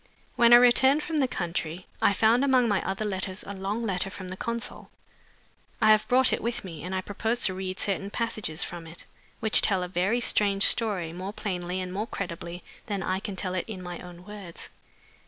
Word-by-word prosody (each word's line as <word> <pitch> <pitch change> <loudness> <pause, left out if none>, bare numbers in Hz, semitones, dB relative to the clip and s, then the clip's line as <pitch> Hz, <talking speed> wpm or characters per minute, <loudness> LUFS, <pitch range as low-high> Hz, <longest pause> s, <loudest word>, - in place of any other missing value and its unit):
When 235 -1 +5
I - - +12
returned 260 +4 +6
from 320 -1 -2
the 270 -3 +3
country 175 -4 -3 0.2
I - - +5
found 225 +5 +4
among 260 -3 +4
my 205 -3 +2
other 195 +3 -2
letters 190 -1 -3
a 200 - -6
long 200 +4 -3
letter 190 -2 0
from 190 -1 -8
the 185 - -5
consul. 235 +4 -5 0.9
I 215 - +6
have 215 0 +4
brought 255 +2 +5
it - - -1
with 240 +1 -2
me, 165 -5 -8
and 185 +2 -3
I 185 - 0
propose 220 +5 -2
to 190 - +3
read 185 0 -4
certain 195 0 -1
passages 215 -8 -2
from 170 -1 -6
it, 165 +1 -10 0.4
which 220 - +4
tell 190 -3 +2
a - - -3
very 185 +6 +1
strange 200 -4 +2
story 195 -8 +1
more 185 +3 -5
plainly 180 -3 -3
and 185 0 -4
more 210 +4 -2
credibly 175 -3 -6 0.2
than 200 -3 -2
I 185 +1 0
can 200 -1 -5
tell 185 0 -3
it 185 - -2
in 195 -5 -7
my 175 -1 -6
own 180 0 -11
words." 200 -5 -9
195 Hz, 210 wpm, -27 LUFS, 180-225 Hz, 0.9 s, I